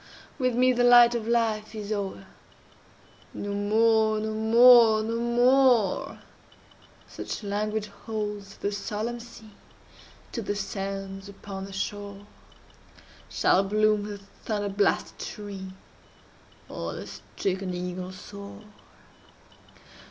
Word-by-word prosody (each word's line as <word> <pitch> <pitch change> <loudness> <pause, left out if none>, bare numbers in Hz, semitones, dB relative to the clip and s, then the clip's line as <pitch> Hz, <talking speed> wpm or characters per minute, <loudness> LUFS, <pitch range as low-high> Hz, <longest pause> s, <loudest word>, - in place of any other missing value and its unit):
with 255 -2 +1
me 255 +1 +4
The 245 0 +1
light 240 -1 +7
of 230 -2 -3
life 225 -2 0
is 210 -1 -6
o'er. 195 -2 -3 1.1
"No 205 0 -4
more—no 220 +1 +2
more—no 225 0 +6
more," 245 -2 +3 0.9
(Such - - -7
language 210 +1 -2
holds 210 -1 -6
the 200 - -2
solemn 215 +3 -4
sea 230 -2 -13 0.8
To 235 - -4
the 205 -1 -3
sands 195 -1 -5
upon 195 -1 -8
the 195 - -10
shore,) 200 +1 -5 1.0
Shall 190 - +3
bloom 210 +1 +2
the 205 -1 -6
thunder 205 +1 -5
blasted 200 +1 0
tree, 195 -2 -7 1.0
Or - - -5
the - - -7
stricken 190 -1 -4
eagle 180 +1 -5
soar! 200 +2 -10
210 Hz, 105 wpm, -26 LUFS, 200-225 Hz, 1.1 s, light